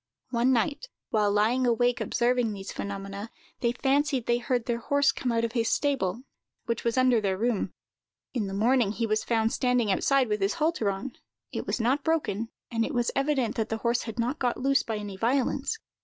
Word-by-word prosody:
One 240 +1 +3
night, 285 - 0 0.2
while 210 -2 +2
lying 230 +5 +2
awake 245 0 +2
observing 240 +1 +1
these 195 -1 -7
phenomena, 200 +1 -5 0.3
they 235 - +1
fancied 270 0 +1
they 240 0 +2
heard 245 -1 -1
their 235 -1 -1
horse 285 +3 +3
come 255 -2 -2
out 230 0 +1
of 230 - -3
his 230 -2 0
stable, 255 -6 0 0.4
which 230 -1 -2
was 235 +1 0
under 255 -3 +4
their 190 -2 0
room. 220 -3 0 0.6
In 225 -6 -1
the 195 - -5
morning, 230 0 +3
he 230 +1 -1
was 215 0 0
found 225 -1 +1
standing 250 -4 +2
outside, 270 +6 +3
with 210 -1 -1
his 195 +1 +1
halter 310 -10 +1
on; 200 +7 -4 0.4
it - - -4
was - - -1
not 260 +5 +1
broken, 235 -9 0 0.2
and 230 -1 +1
it - - -3
was 240 -1 +1
evident 275 -4 +1
that 225 -1 -1
the 225 - -1
horse 235 +1 +1
had 225 0 -7
not 245 +6 -1
got 245 -2 0
loose 275 +1 +2
by 220 -2 -3
any 205 -2 -6
violence. 245 +5 0
235 Hz, 200 wpm, -27 LUFS, 220-255 Hz, 0.6 s, under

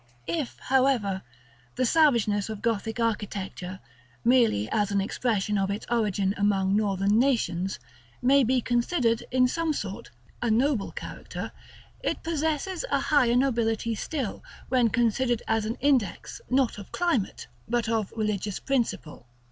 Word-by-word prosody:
§ - - -33 0.2
IX. 335 - -1
If, - - -22
however, 255 -8 +2 0.5
the 255 - +1
savageness 230 -9 +3
of 215 -2 -6
Gothic 225 0 -1
architecture, 200 -4 -3 0.5
merely 230 - +4
as 205 -2 +1
an 200 - +2
expression 210 0 0
of 195 0 0
its 200 +2 -3
origin 205 -4 +1
among 195 -1 +2
Northern 200 0 +2
nations, 215 -8 +1 0.4
may 270 +2 +4
be 255 +1 +2
considered, 240 -1 +1
in 255 0 +4
some 325 +4 0
sort, 200 -8 -5 0.3
a 240 - 0
noble 235 -1 +1
character, - - -7 0.5
it - - -2
possesses 320 - -1
a - - +2
higher 255 -6 +3
nobility 230 -3 +1
still, 255 0 -4 0.3
when 250 -2 +3
considered 240 +1 +1
as 220 -1 +1
an 225 +2 -2
index, 255 -10 0
not 255 -4 +1
of 200 - -11
climate, 335 - -1 0.2
but 240 -1 0
of 220 -3 0
religious 210 -2 -1
principle. 230 - -2
230 Hz, 140 wpm, -27 LUFS, 205-255 Hz, 0.5 s, merely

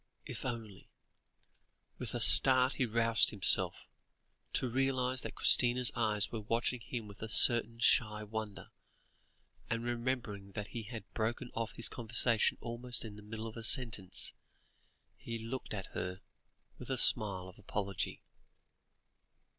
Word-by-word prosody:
If - - -9
only 115 -6 -8 1.1
With - - -7
a - - -3
start 130 0 +6
he 130 - -3
roused 115 0 +3
himself, 100 -3 +3 0.7
to 130 - -1
realise 130 0 -2
that - - -8
Christina's 125 0 +3
eyes 110 -3 +2
were 115 - -6
watching 115 +4 -2
him 115 0 -8
with 100 0 -15
a 110 - -7
certain 115 0 +5
shy 105 -2 +1
wonder, 105 -1 -8 1.0
and 115 0 -4
remembering 120 -5 -5
that 105 -2 -7
he 120 - -7
had 110 +1 -10
broken 120 +2 -4
off 115 -1 -6
his 115 - +1
conversation 115 0 0
almost 120 0 -3
in 105 -2 -10
the 105 - -13
middle 110 +1 -9
of 110 - -9
a 115 - -9
sentence, 110 -5 +3 0.8
he 115 0 -8
looked 115 +4 -8
at 100 -3 -8
her 90 +2 -6 0.6
with - - -12
a - - -3
smile 95 -4 +4
of 95 +2 -16
apology. 100 -2 -5
115 Hz, 140 wpm, -31 LUFS, 105-120 Hz, 1.1 s, start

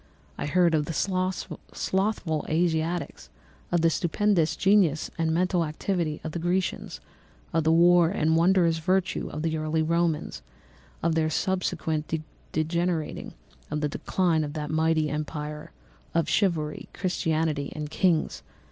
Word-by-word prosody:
I - - -4
heard 175 +2 +3
of 150 -2 +2
the 165 - -4
slothful 185 -1 -1
Asiatics, 165 +1 -1 0.4
of 175 -1 +2
the 165 - +5
stupendous 175 0 +1
genius 190 -6 +3
and 165 -1 0
mental 175 +1 +2
activity 160 0 -2
of 160 - -4
the 170 - -4
Grecians, 180 +2 -1 0.5
of 165 -1 +1
the 160 - +4
wars 175 +2 +5
and 160 +1 +3
wonderful 170 -1 +3
virtue 185 +3 0
of 155 +1 -5
the 160 -1 0
early 155 +1 0
Romans—of 155 - -3
their 160 -1 +1
subsequent 165 -3 -1 0.4
degenerating—of 160 -2 -3
the 150 - 0
decline 165 +1 0
of 145 -1 -5
that 150 -1 -4
mighty 160 0 +2
empire, 150 0 -4 0.5
of 165 -2 +2
chivalry, 160 -6 0
Christianity, 160 -5 -1
and 150 0 -5
kings. 170 -2 +1
165 Hz, 130 wpm, -26 LUFS, 155-175 Hz, 0.5 s, the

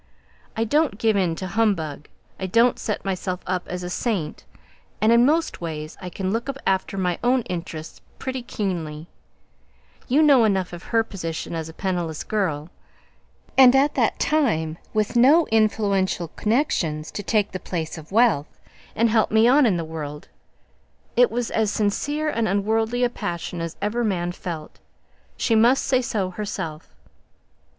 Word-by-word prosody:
I 225 - +2
don't 290 -1 +1
give 220 -1 +2
in 180 -4 +1
to 185 - -5
humbug 185 -8 -1 0.3
I 190 - -2
don't 230 +6 +3
set 210 - -3
myself 185 -1 -2
up 180 -1 -2
as 180 0 -5
a 180 - -4
saint 185 -8 -2 0.5
and 215 +1 +4
in 235 +2 +6
most 320 - 0
ways 155 -2 -5
I 180 - -5
can 190 +1 -3
look 235 +4 -2 0.2
after 190 +1 0
my 180 -2 0
own 250 0 +3
interests 165 -4 -6 0.2
pretty 260 -1 -4
keenly; 170 -9 -4 1.0
you 285 +5 +4
know 280 -5 +6
enough 190 -4 +1
of 175 - -9
her 225 -1 +2
position 170 -6 -5
as 160 -1 -4
a - - -10
penniless 175 -4 -3
girl, 175 -7 -2 0.8
and 260 -1 +8
at 285 +2 +4
that - - +1
time, 165 - +1
with 215 +2 -1
no 285 +8 +6
influential 200 -5 +1
connections 170 - -1
to - - -4
take 210 0 +1
the 185 - -4
place 165 -3 -4
of 160 0 -11
wealth, 215 -10 +2 0.4
and 230 - +3
help 220 -1 +3
me 220 +2 +4
on 265 +1 +5
in 190 -5 +2
the 165 - -3
world, 150 -2 -7 0.9
it - - +5
was 245 -1 -2
as 220 -2 +1
sincere 290 +10 -1
and 230 -7 0
unworldly 220 +4 +1
a 245 - +3
passion 175 -5 -4
as 165 -1 -5
ever 230 +4 0
man 175 -5 -1
felt; 170 -4 -7 0.6
she 230 - +1
must 235 +4 +4
say 255 -1 +2
so 210 -7 -2
herself. 180 -6 -6
200 Hz, 160 wpm, -23 LUFS, 170-235 Hz, 1.0 s, and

